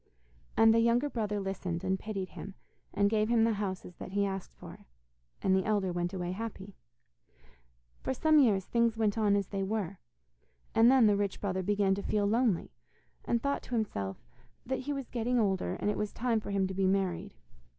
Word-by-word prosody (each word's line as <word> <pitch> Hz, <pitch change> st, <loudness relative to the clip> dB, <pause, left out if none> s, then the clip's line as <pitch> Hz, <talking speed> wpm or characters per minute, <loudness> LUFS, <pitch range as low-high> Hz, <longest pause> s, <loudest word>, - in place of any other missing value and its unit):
And 225 Hz, 0 st, +7 dB
the 230 Hz, -, +4 dB
younger 235 Hz, +5 st, +2 dB
brother 210 Hz, -3 st, -1 dB
listened 185 Hz, -3 st, -3 dB
and 190 Hz, 0 st, 0 dB
pitied 195 Hz, -3 st, -4 dB
him, 195 Hz, -1 st, -9 dB, 0.4 s
and 200 Hz, +1 st, +2 dB
gave 215 Hz, +1 st, +1 dB
him 235 Hz, -1 st, +4 dB
the 225 Hz, 0 st, +3 dB
houses 185 Hz, -3 st, -5 dB
that 185 Hz, -, -8 dB
he 200 Hz, 0 st, +2 dB
asked 195 Hz, -1 st, -5 dB
for, -, -, -12 dB, 0.6 s
and 190 Hz, -1 st, +3 dB
the 190 Hz, -, +2 dB
elder 205 Hz, -4 st, 0 dB
went 175 Hz, 0 st, -1 dB
away 180 Hz, -2 st, -3 dB
happy. 200 Hz, -1 st, -6 dB, 1.3 s
For -, -, -2 dB
some 310 Hz, +3 st, +4 dB
years 205 Hz, -9 st, +3 dB
things 235 Hz, -1 st, +1 dB
went 215 Hz, -2 st, +1 dB
on 210 Hz, -3 st, +3 dB
as 200 Hz, -2 st, -1 dB
they 195 Hz, -1 st, -3 dB
were, 195 Hz, -2 st, -2 dB, 0.7 s
and 225 Hz, +1 st, +6 dB
then 260 Hz, -3 st, +6 dB
the 205 Hz, -1 st, +5 dB
rich 200 Hz, -1 st, -1 dB
brother 190 Hz, -2 st, -1 dB
began 200 Hz, 0 st, +2 dB
to 200 Hz, -, -2 dB
feel 205 Hz, 0 st, 0 dB
lonely, 220 Hz, -3 st, +1 dB, 0.5 s
and 235 Hz, -1 st, 0 dB
thought 280 Hz, 0 st, 0 dB
to 245 Hz, -, -5 dB
himself 100 Hz, -, -2 dB, 0.5 s
that 265 Hz, +2 st, -2 dB
he 280 Hz, +3 st, -4 dB
was 275 Hz, -3 st, -4 dB
getting 245 Hz, +1 st, 0 dB
older, 195 Hz, -4 st, 0 dB
and 205 Hz, -, -1 dB
it -, -, -4 dB
was 210 Hz, -1 st, -2 dB
time 235 Hz, -2 st, 0 dB
for 215 Hz, -, -8 dB
him 200 Hz, -1 st, +1 dB
to 190 Hz, -, -4 dB
be 190 Hz, 0 st, +1 dB
married. 190 Hz, 0 st, -1 dB
205 Hz, 200 wpm, -31 LUFS, 190-230 Hz, 1.3 s, And